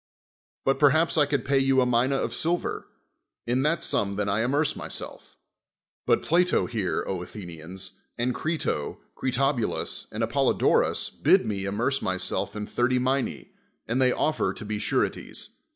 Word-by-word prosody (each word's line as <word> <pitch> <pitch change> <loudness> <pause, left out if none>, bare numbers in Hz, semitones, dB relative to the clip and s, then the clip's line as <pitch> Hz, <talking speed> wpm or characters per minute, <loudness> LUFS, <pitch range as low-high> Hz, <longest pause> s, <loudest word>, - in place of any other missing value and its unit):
But 135 - +2
per 145 - +7
haps 160 +4 +2
I 150 -3 +4
could 140 -3 -1
pay 140 0 +3
you 135 0 +3
a 130 - +4
mina 125 +2 +2
of - - -1
silver; 170 +2 -1 0.6
in 125 +2 +1
that 150 +4 +1
sum 100 -1 +1
then 105 0 -1
I 100 +2 +1
amerce 140 +5 +1
myself. - - -7 0.7
But - - +3
Plato 180 +3 +3
here, 110 -6 -1
Athenians, 90 -1 -7 0.2
and 125 +1 0
Crito, 155 - -2 0.2
Critobulus, 130 -2 -1
and - - -2
Apollo - - +2
d'trus - - +2
bid - - +3
me 100 -2 -2
amerce 120 +8 0
myself 95 +3 -1
in 105 0 -3
thirty 125 +3 +1
mina', 130 +1 0 0.4
and 125 +3 0
they 130 -1 +5
ofi'er 155 +4 0
to 110 - -8
be 105 0 -3
sureties. - - -1
125 Hz, 155 wpm, -26 LUFS, 105-140 Hz, 0.7 s, per